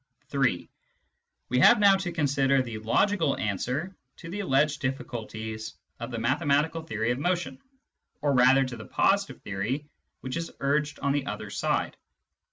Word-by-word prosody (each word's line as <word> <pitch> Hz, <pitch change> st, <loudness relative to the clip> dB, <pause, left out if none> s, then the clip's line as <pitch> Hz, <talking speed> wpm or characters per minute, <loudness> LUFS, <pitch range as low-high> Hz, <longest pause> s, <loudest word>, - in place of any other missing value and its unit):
(3) 130 Hz, -11 st, 0 dB, 0.8 s
We 125 Hz, -, +2 dB
have -, -, +7 dB
now 200 Hz, -2 st, +6 dB
to 185 Hz, -2 st, -3 dB
consider 140 Hz, -4 st, +2 dB
the 115 Hz, -3 st, -6 dB
logical 160 Hz, -, +1 dB
answer 125 Hz, -, -2 dB, 0.2 s
to 165 Hz, -2 st, -9 dB
the 205 Hz, -, -4 dB
alleged 150 Hz, -5 st, +1 dB
difficulties 110 Hz, -4 st, -5 dB, 0.2 s
of 120 Hz, +1 st, -5 dB
the 120 Hz, -, -4 dB
mathematical 145 Hz, +6 st, +1 dB
theory 110 Hz, -7 st, -2 dB
of 120 Hz, -, -2 dB
motion, 170 Hz, -5 st, -1 dB, 0.6 s
or 145 Hz, -1 st, +1 dB
rather 130 Hz, +1 st, +5 dB
to 125 Hz, -2 st, -6 dB
the 110 Hz, -, -9 dB
positive 200 Hz, 0 st, +1 dB
theory 105 Hz, +9 st, -3 dB, 0.4 s
which 130 Hz, +4 st, -4 dB
is 165 Hz, 0 st, -4 dB
urged 145 Hz, +1 st, 0 dB
on 140 Hz, -, +1 dB
the 140 Hz, -1 st, -1 dB
other -, -, -5 dB
side. -, -, -1 dB
135 Hz, 155 wpm, -27 LUFS, 120-160 Hz, 0.8 s, have